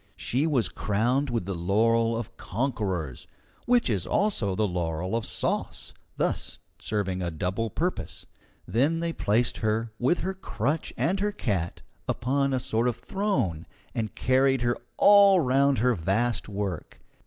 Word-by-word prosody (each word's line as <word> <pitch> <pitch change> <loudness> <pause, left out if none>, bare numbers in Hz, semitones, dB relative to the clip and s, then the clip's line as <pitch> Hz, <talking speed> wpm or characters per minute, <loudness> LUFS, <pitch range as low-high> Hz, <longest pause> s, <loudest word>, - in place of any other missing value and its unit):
She 140 +6 0
was 130 - +2
crowned 120 +10 0
with 115 -6 -1
the 100 - -3
laurel 115 +6 +2
of 115 0 -6
conquerors, 95 - -3 0.4
which 245 -1 +4
is 100 -8 -1
also 125 - +1
the 105 +2 +1
laurel 90 +1 -2
of 115 - -2
sauce, - - -3 0.2
thus - - -1 0.2
serving 95 -3 -2
a 85 - -1
double 90 +7 -2
purpose. 175 - -3 0.4
Then 145 +8 +2
they 170 0 -2
placed 115 0 +1
her, 110 0 -1
with 130 +8 +2
her 190 - -2
crutch 155 - -2
and 190 +4 +1
her 205 +1 +1
cat, 100 - -2 0.3
upon 135 +3 0
a 130 - +1
sort 115 0 0
of 120 - 0
throne, 130 - -1 0.3
and 110 -2 -3
carried 130 0 +2
her 120 0 +2 0.2
all 200 -2 +7
round 140 -1 +3
her 125 +4 +3
vast 105 +6 0
work. 100 -5 -4
115 Hz, 150 wpm, -27 LUFS, 100-140 Hz, 0.4 s, all